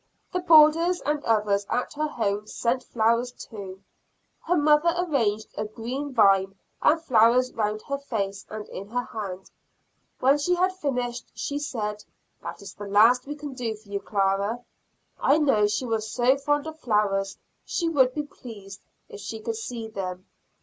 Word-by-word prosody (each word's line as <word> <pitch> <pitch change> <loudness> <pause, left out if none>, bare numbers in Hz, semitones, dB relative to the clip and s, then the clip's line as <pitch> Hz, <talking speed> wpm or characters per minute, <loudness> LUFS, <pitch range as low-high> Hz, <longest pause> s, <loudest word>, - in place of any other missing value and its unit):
The 365 - +1
boarders 330 +1 +6
and 295 0 0
others 205 -3 +1
at 250 - -1
her 305 +1 -1
home 210 -6 -2
sent 250 +3 -1
flowers 235 +2 +1
too. 200 -5 -10 0.6
Her 355 +2 +1
mother 305 +3 +4
arranged 235 -12 0
a - - -2
green 245 +7 -5
vine 195 -5 +4 0.3
and 325 - +4
flowers 250 -3 +4
around 215 -1 -2
her 280 0 -3
face 200 -8 -3
and 215 -1 -7
in 195 - -7
her 245 +3 -2
hand. 195 -5 -7 0.7
When 275 +3 +4
she 355 +5 +2
had 370 +1 +2
finished, 250 -8 -3
she 285 0 -3
said, 210 -7 -4 0.4
"That - - -7
is 200 - -9
the 205 - -8
last 230 +6 +5
we 295 - -4
can 295 -2 -7
do 240 -4 -3
for 210 -1 -19
you, 200 0 -2
Clara; 200 +4 0 0.6
I 285 - +4
know 270 -9 +3
she 210 +5 -1
was 220 -2 -2
so 250 +2 +3
fond 290 +1 0
of 315 0 -7
flowers, 200 -5 0 0.3
she 340 - -2
would 265 -6 +3
be 300 - -1
pleased 205 -8 -11 0.3
if - - -10
she 220 +2 -6
could 225 +1 -3
see 225 0 -5
them." 185 -3 -5
235 Hz, 170 wpm, -26 LUFS, 210-290 Hz, 0.7 s, boarders